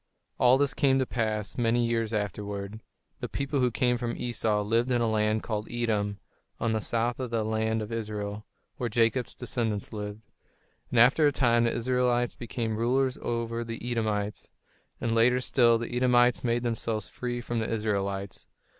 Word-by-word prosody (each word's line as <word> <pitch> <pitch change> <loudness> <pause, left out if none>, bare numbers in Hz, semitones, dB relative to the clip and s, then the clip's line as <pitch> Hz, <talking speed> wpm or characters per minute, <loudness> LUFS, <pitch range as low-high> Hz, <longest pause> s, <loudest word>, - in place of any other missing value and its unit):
All 125 +1 +6
this 140 -2 +2
came 135 +1 +3
to 130 - +2
pass 110 -2 -2
many 120 0 +2
years 115 -1 0
afterward. 105 0 -3 0.4
The - - -4
people 140 0 -2
who 125 -1 +3
came 125 +2 +1
from 120 -1 -3
Esau 110 -3 0
lived 115 +4 +1
in 125 -1 +2
a 120 - +1
land 110 0 +1
called 105 -1 -3
Edom, 105 -4 -1 0.4
on 115 - 0
the 110 - 0
south 115 +3 -1
of 130 -2 -3
the 115 -1 0
land 110 0 0
of 105 - -8
Israel, 105 -2 -4 0.3
where 120 - -2
Jacob's 115 +2 +1
descendants 115 -5 -3
lived. 105 0 -6 0.6
And 120 - +2
after 135 +6 +6
a - - +3
time 120 -4 +3
the 115 - +1
Israelites 120 0 +1
became 115 -2 -3
rulers 130 +3 +1
over 115 0 -2
the 115 +1 -5
Edomites; 105 -3 -2 0.5
and 115 -1 -1
later 120 +2 +4
still, 120 -2 +4
the 120 +1 -5
Edomites 125 -1 +3
made 120 0 +1
themselves 115 -2 -2
free 120 -1 -4
from 120 -1 -3
the 110 - -2
Israelites. 100 -3 -2
115 Hz, 170 wpm, -28 LUFS, 110-120 Hz, 0.6 s, All